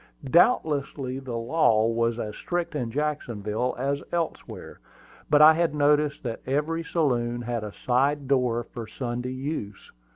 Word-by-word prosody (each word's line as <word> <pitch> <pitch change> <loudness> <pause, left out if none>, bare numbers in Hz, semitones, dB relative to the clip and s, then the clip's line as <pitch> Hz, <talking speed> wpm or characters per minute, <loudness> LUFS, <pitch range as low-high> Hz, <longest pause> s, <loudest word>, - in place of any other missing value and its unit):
Doubtless 160 - +4
the 135 -3 -5 0.3
law 115 -3 +2
was 115 0 0
as 105 -3 -4
strict 175 -1 -3
in 125 -6 -2
Jacksonville 125 -5 -2
as 140 +2 -1
elsewhere; 170 -1 -4 0.5
but 150 0 +6
I 155 +1 +9
had 165 -2 0
noticed 150 0 +2
that 115 -3 -4
every 150 +5 -1
saloon 120 -8 0
had 120 -2 -3
a 105 - -5
side 135 +3 +1
door 125 -3 +1
for 115 -1 -8
Sunday 125 0 -4
use. 130 -6 -5
135 Hz, 140 wpm, -26 LUFS, 120-150 Hz, 0.5 s, I